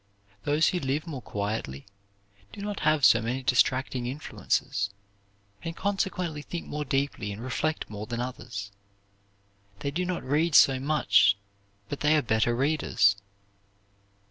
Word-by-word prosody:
Those 150 +2 +3
who 180 - -1
live 140 +2 -1
more 145 -7 -6
quietly 100 - -4 0.7
do - - -11
not 205 0 -4
have 155 -3 +3
so 115 - +6
many 125 +4 -2
distracting 125 0 +2
influences, 125 -6 -2 0.7
and 165 0 -5
consequently 185 -6 -2
think 170 +3 -6
more 150 0 -4
deeply 135 -6 -1
and 100 - -7
reflect 140 +6 -2
more 105 0 -7
than 120 -1 -4
others. 120 -5 -5 1.1
They 140 - -2
do 175 +5 -1
not 180 -1 -3
read 150 +4 +1
so 135 -1 +7
much 135 -8 +4 0.5
but 145 - -5
they 150 +1 +4
are 150 - +1
better 110 +1 +2
readers. 135 -7 +3
135 Hz, 140 wpm, -27 LUFS, 115-155 Hz, 1.1 s, so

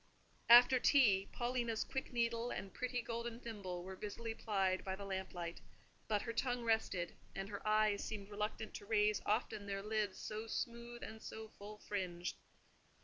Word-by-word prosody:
After 245 +2 +10
tea, 210 -9 +5
Paulina's 240 -2 0
quick 265 - -4
needle 235 0 +1
and 195 - -5
pretty 250 -1 -2
golden 235 0 -4
thimble 200 -7 -5
were 190 +1 -6
busily 225 +3 -4
plied 195 -4 +1
by 190 -1 -2
the 200 +1 -7
lamp 190 -1 -3
light, 170 -1 -5 0.5
but 210 -2 +1
her 230 - -3
tongue 245 +1 0
rested, 220 -6 +1 0.2
and 195 0 -3
her 200 -1 -5
eyes 215 -1 +3
seemed 205 -2 -5
reluctant 210 +1 -3
to - - -7
raise 210 -1 +3
often 210 -1 0
their 195 0 -2
lids, 210 -2 0
so 215 +1 -4
smooth 235 +1 -4
and 220 0 -7
so 220 0 -7
full 210 0 -10
fringed. 180 -4 -3
215 Hz, 165 wpm, -38 LUFS, 195-235 Hz, 0.5 s, After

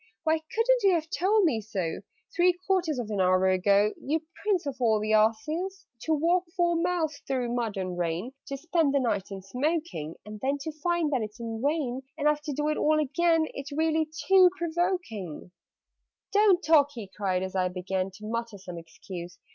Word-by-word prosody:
"Why 315 0 +2
couldn't 460 +10 +1
you 390 -3 +4
have 320 -1 -3
told 405 +4 +3
me 260 -11 +2
so 190 -6 -3 0.4
Three 355 +1 +4
quarters 355 -6 +1
of 230 -3 -4
an 200 -2 0
hour 185 +1 +3
ago, 200 +3 +3
You 310 +3 -1 0.2
prince 395 -6 +1
of 275 -2 -4
all 220 -3 +3
the 215 +1 0
asses? 310 - +1 0.2
"To 320 - +2
walk 345 +4 +2
four 345 -1 +3
miles 335 -2 0
through 250 -3 -1
mud 230 -4 -2
and 185 -2 -3
rain, 175 +7 -2 0.2
To 275 - -4
spend 320 -1 +1
the - - +4
night 205 -6 0
in 195 -1 -7
smoking, 255 - -2
And 210 0 -8
then 275 +2 0
to 315 - -4
find 320 0 0
that 255 - +1
it's 215 +2 -6
in 225 -1 -5
vain 280 -4 0 0.2
And 300 -1 +1
I've 300 0 +2
to 300 - -2
do 295 +2 -1
it 305 - 0
all 310 0 +3
again 320 +3 +2
It's 275 0 -7
really 315 +1 +1 0.2
too 380 -1 +7
provoking! 335 - -2 0.8
"Don't 405 -3 +5
talk!" 295 -3 +5
he 220 -4 -6
cried, 190 -3 0
as 190 0 -5
I 185 -1 +2
began 185 +1 -2
To 205 +3 -12
mutter 230 -1 -3
some 180 -3 -8
excuse. 175 +2 -9
275 Hz, 195 wpm, -28 LUFS, 205-330 Hz, 0.8 s, too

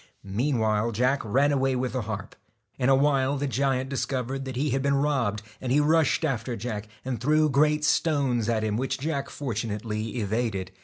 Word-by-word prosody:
Meanwhile 110 0 0
Jack 125 +5 +2
ran 135 +7 +2
away 135 -1 +1
with 125 0 -2
the 130 - -1
harp. 110 -2 -6 0.4
In 125 - +2
a 135 - +6
while 140 0 +2
the 140 - -1
giant 135 -1 0
discovered 135 0 -2
that 130 -1 -5
he 145 +3 0
had 135 +2 +1
been 140 +1 +2
robbed, 130 -8 0 0.2
and 130 - -3
he 140 - +4
rushed 160 +2 +3
after 125 -4 -2
Jack, 110 -2 -5 0.2
and 130 -3 -3
threw 155 +3 +3
great 150 +2 +3
stones 135 -8 +1
at 110 -2 +1
him, 105 -1 0
which 130 +2 -1
Jack 140 0 -2
fortu 115 -5 -3
nately 105 +1 -4
evaded. 105 -3 -2
130 Hz, 190 wpm, -26 LUFS, 115-140 Hz, 0.4 s, a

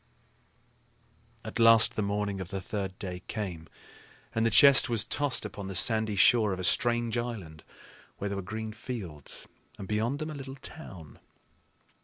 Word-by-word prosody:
At - - -5
last 115 -1 +6
the - - -1
morning 100 -1 -2
of 90 - -7
the 95 - -4
third 95 -1 -5
day 90 -3 -6
came, 90 -7 -5 0.7
and 115 - 0
the 115 - +3
chest 140 +3 +7
was 115 -2 +2
tossed 140 +2 0
upon 100 -2 -7
the 95 - -6
sandy 110 +2 +2
shore 105 +2 +5
of 95 - -5
a - - -4
strange 120 +4 +1
island 100 -10 -6 0.5
where 100 - -3
there 100 0 -3
were - - -3
green 110 +4 -6
fields 100 - -7 0.3
and, 100 - -8
beyond 110 +6 0
them, 155 +1 -5
a - - -6
little 135 -2 -7
town. 95 - -11
105 Hz, 165 wpm, -29 LUFS, 95-120 Hz, 0.7 s, chest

